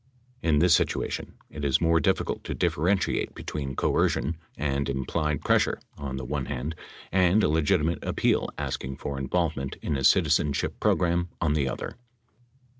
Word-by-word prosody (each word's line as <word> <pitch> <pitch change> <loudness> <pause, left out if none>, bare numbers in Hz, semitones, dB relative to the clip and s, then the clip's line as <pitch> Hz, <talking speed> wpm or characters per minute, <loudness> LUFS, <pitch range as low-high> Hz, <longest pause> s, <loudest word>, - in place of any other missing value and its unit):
In 80 -3 +2
this 85 +2 +5
situation - - 0 0.2
it 75 - -7
is 70 0 +3
more 85 0 +3
difficult 75 - 0
to - - -3
differentiate 95 +6 0
between 70 -3 -5
coercion 75 +7 +1 0.2
and 70 -1 -1
implied 75 +3 -1
pressure - - +2 0.2
on 70 -2 -5
the 65 - -5
one 70 0 -2
hand 70 +6 -3 0.4
and 95 +3 +4
a - - +4
legitimate 80 +2 +1
appeal - - +1
asking 65 +1 -4
for 70 -1 -4
involvement 70 -1 -1
in 75 - -1
a 65 - -2
citizenship 70 +2 +3
program 85 0 +2
on 80 -4 +1
the 70 -3 +1
other. - - -5
75 Hz, 150 wpm, -27 LUFS, 70-85 Hz, 0.4 s, this